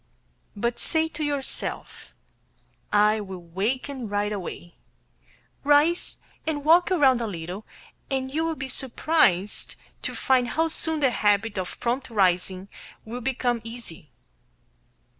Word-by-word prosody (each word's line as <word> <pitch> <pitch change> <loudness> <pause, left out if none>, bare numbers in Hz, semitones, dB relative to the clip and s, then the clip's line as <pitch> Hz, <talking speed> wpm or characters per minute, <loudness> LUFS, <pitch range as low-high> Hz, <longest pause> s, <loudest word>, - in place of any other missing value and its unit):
But 235 +3 -1
say 320 0 +1
to 315 - -4
yourself, 285 -2 -3 0.8
"I 210 +1 +4
will 190 -3 -6
waken 230 +8 -2
right 205 +1 0
away," 175 -3 -6 0.9
rise 295 +4 +3 0.3
and 295 -2 -1
walk 340 +3 +6
around 270 -9 +4
a 230 - -1
little, 180 +2 -6 0.4
and 265 -1 -2
you 320 +2 +1
will 325 0 0
be 270 -2 -5
surprised 245 - +1 0.3
to - - -4
find 255 -2 +3
how 325 +5 +1
soon 320 -1 -1
the 265 -3 +4
habit 210 -1 +2
of 180 - -5
prompt 250 +3 -1
rising 185 -2 +1 0.4
will 240 +3 -5
become 245 -1 0
easy. 230 - -9
240 Hz, 125 wpm, -26 LUFS, 205-290 Hz, 0.9 s, walk